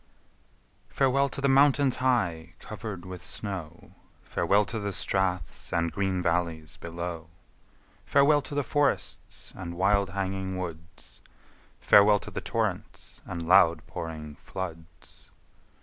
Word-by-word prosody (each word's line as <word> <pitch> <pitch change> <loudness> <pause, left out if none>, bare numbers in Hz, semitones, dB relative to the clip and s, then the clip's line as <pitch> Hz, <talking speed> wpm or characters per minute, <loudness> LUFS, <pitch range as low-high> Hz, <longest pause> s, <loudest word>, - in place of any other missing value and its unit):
Farewell 135 +1 +2
to 140 - -5
the 140 - +2
mountains, 140 -1 +4
high 90 -11 0
cover'd 105 -5 -7
with 90 -1 -8
snow, 90 -6 -5 0.3
Farewell 100 +1 +2
to 115 - -4
the 100 -1 -3
straths 95 -2 -1
and 85 -1 0
green 95 -2 -1
valleys 85 -3 -1
below, 85 0 -6 0.7
Farewell 145 +1 +4
to 140 - -8
the 145 - +1
forests 145 +3 -2
and 85 -2 -6
wild 100 +1 +2
hanging 95 0 -3
woods, 85 -2 -8 0.6
Farewell 105 +1 +6
to - - -8
the - - -4
torrents - - -3
and 85 -1 -5
loud 85 -4 +5
pouring 80 -2 -6
floods! 85 -4 -9
95 Hz, 120 wpm, -28 LUFS, 85-110 Hz, 0.7 s, Farewell